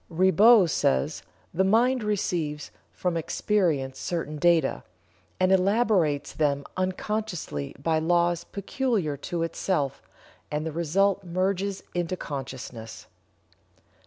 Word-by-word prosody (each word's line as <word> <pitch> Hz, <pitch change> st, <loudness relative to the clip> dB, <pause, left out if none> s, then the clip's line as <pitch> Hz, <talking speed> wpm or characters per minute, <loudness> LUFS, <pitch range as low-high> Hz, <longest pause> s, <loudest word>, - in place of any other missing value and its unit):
Ribot 190 Hz, +2 st, +5 dB
says: 65 Hz, -, +1 dB, 0.3 s
"The 190 Hz, -, +2 dB
mind 240 Hz, +6 st, +3 dB
receives 170 Hz, -8 st, -2 dB, 0.2 s
from 180 Hz, -2 st, -2 dB
experience 165 Hz, -5 st, 0 dB
certain 165 Hz, -3 st, -3 dB
data, 170 Hz, 0 st, +2 dB, 0.6 s
and 185 Hz, 0 st, +3 dB
elaborates 190 Hz, -6 st, +2 dB
them 140 Hz, -2 st, 0 dB
unconsciously 185 Hz, -, -3 dB
by 160 Hz, +3 st, 0 dB
laws 170 Hz, +1 st, +2 dB
peculiar 200 Hz, -, -2 dB
to 165 Hz, +4 st, -3 dB
itself, 155 Hz, -4 st, -1 dB, 0.5 s
and 150 Hz, +1 st, -2 dB
the 160 Hz, -, -2 dB
result 190 Hz, +5 st, +1 dB
merges 190 Hz, +2 st, -1 dB
into 175 Hz, +1 st, -2 dB
consciousness." 130 Hz, -6 st, -7 dB
175 Hz, 100 wpm, -26 LUFS, 150-195 Hz, 0.6 s, Ribot